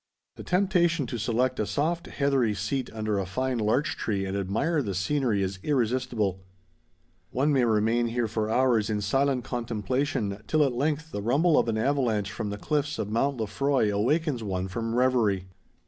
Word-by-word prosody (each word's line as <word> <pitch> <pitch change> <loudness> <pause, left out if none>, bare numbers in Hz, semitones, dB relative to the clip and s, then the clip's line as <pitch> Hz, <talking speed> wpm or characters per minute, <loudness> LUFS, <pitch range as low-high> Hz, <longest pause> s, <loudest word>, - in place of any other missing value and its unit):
The - - -9
temptation 180 -5 +2
to 120 0 -5
select 125 +4 0
a 105 - +1
soft 165 +4 -1
heathery 135 -6 +1
seat 110 +7 -2
under 110 -2 -1
a 95 - -3
fine 130 +5 -1
larch 110 +8 +1
tree 100 -3 -2
and 95 +1 -3
admire 105 - 0
the 100 -7 -3
scenery 115 0 +1
is 95 0 -3
irresistible. 120 -7 0 0.9
One 145 +4 +1
may 130 -3 +3
remain 115 +2 +2
here 115 0 -1
for 110 0 -2
hours 120 -3 +2
in 105 -1 -1
silent 135 +4 +1
contemplation, 115 -2 -2
till 155 -1 +3
at 135 -3 +1
length 150 +5 -1
the 100 - -4
rumble 145 - +3
of - - +3
an 110 - 0
avalanche 110 -5 0
from 105 -1 -4
the 100 - -4
cliffs 150 +5 -1
of 105 - -3
Mount 135 +4 +1
Lefroy 115 +1 +1
awakens 145 +4 +1
one 95 -3 -2
from 115 +4 -3
reverie. 120 -7 +2
120 Hz, 175 wpm, -27 LUFS, 105-140 Hz, 0.9 s, may